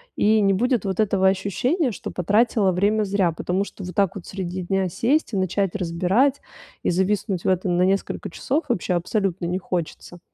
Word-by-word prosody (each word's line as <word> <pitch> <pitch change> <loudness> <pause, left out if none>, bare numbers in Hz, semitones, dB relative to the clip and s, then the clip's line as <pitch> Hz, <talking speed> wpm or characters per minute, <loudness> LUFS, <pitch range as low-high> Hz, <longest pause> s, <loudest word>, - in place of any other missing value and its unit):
И 215 +1 +3
не 195 -1 +3
будет 240 +2 +1
вот 190 0 -2
этого 195 -2 +2
ощущения, 245 - 0
что - - -7
потратила 205 +1 +2
время 205 +4 +2
зря, 195 -3 +1
потому 180 +4 -1
что 200 - -10
вот 180 0 -6
так 200 -3 +2
вот 190 - -8
среди 185 -1 -5
дня 190 +1 0
сесть 250 - 0
и 195 - 0
начать 190 +1 0
разбирать, 190 +10 +1 0.4
и - - +1
зависнуть 190 +1 0
в - - 0
этом 185 -1 +1
на 180 - +3
несколько 195 +1 -1
часов 280 - -2
вообще 185 -5 0
абсолютно 180 0 -1
не 180 - -1
хочется. 175 -1 -5
195 Hz, 185 wpm, -23 LUFS, 180-210 Hz, 0.4 s, И